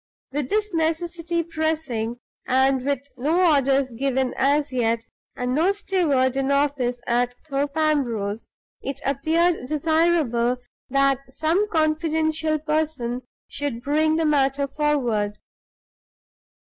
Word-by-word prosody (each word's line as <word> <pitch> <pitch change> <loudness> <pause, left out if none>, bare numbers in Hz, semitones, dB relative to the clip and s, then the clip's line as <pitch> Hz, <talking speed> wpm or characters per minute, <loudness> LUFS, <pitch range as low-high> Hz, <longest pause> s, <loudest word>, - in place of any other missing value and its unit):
With 275 -1 -2
this 425 -2 0
necessity 335 +1 -1
pressing, 310 -8 -2 0.3
and 265 0 +3
with 280 -1 0 0.2
no 325 +6 +3
orders 275 -1 +2
given 265 +1 0
as 285 +1 +1
yet, 230 -2 0 0.3
and 250 0 -2
no 330 +7 +3
steward 310 -10 +1
in 270 0 0
office 280 -4 +1
at 245 +1 +1
Thorpe 280 +1 -2
Ambrose, 235 -9 0 0.3
it 275 - -5
appeared 315 +2 +1
desirable 305 -6 +2 0.3
that 275 0 +3
some 330 +10 0
confidential 315 -1 +1
person 300 -5 -1 0.3
should 280 -5 -4
bring 310 +3 +2
the 325 0 +1
matter 280 -2 +2
forward. 245 -8 0
285 Hz, 110 wpm, -23 LUFS, 255-315 Hz, 0.3 s, and